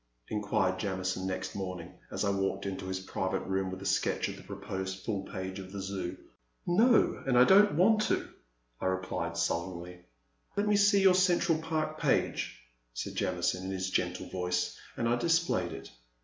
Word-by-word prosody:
inquired 105 -3 0
Jamison 95 -1 -2
next 95 0 -3
morn 90 -2 -4
ing 85 - -12 0.2
as - - -2
I 100 - +2
walked 95 0 -1
into 95 -1 -4
his 95 0 -3
private 95 0 -2
room 95 0 -1
with 95 +1 -6
a - - -7
sketch - - +1
of - - -6
the - - -11
proposed 95 0 -5
full 100 -4 -1
page 95 0 -5
of 95 -1 -9
the 100 - -5
Zoo. 95 -2 -4 0.5
No, 225 +7 +4
and 125 -2 +3
I 125 - +9
don't 205 +8 +6
want 215 +6 +5
to,'* - - -1 0.5
I - - -1
replied, 95 -3 -2
sullenly. 90 +1 -2 0.6
*'Let 205 +1 +1
me 210 - +4
see 200 -1 +5
your 190 -1 +7
Central 180 -3 +3
Park 155 -1 -2
page, - - 0 0.3
said - - -4
Jamison 90 0 0
in - - -3
his 95 0 -2
gentle 90 -1 -1
voice, 90 -1 -1 0.2
and 115 - 0
I 120 +1 +2
displayed 165 - +1
it. - - -8
95 Hz, 180 wpm, -31 LUFS, 95-155 Hz, 0.6 s, I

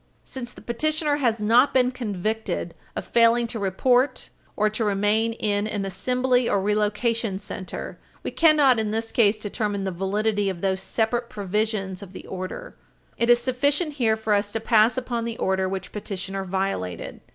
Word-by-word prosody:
Since 245 -2 -6
the - - -14
petitioner 300 +4 0
has 235 -6 +1
not 235 +7 +4
been 250 -1 +4
convicted 220 -2 -3 0.2
of - - -4
failing 235 0 +4
to 230 -1 -4
report 245 +7 +1 0.3
or 215 - +2
to 215 +2 -2
remain 210 +2 +1
in 210 -2 -1
an 205 -2 -3
assembly 250 +5 +1
or 200 - +2
relocation 210 +1 0
center, 190 -2 -6 0.2
we - - -3
cannot 295 -7 +5
in 215 -1 -1
this 225 +1 -2
case 215 -2 +3
determine 205 -1 -2
the 190 - -2
validity 200 +3 0
of 180 -3 -5
those 190 -1 0
separate 235 +1 -1
provisions 205 -2 -2
of 195 -1 -10
the - - -9
order. 190 - -6 0.4
It 235 - +2
is 240 - +8
sufficient 285 +6 0
here 230 -6 +1
for 220 -1 0
us 205 0 +1
to 225 - -1
pass 225 +1 +4
upon 240 -2 -2
the 230 0 -4
order 190 0 0
which 190 0 -5
petitioner 195 -1 -5
violated. 185 - -3
220 Hz, 170 wpm, -24 LUFS, 195-240 Hz, 0.4 s, is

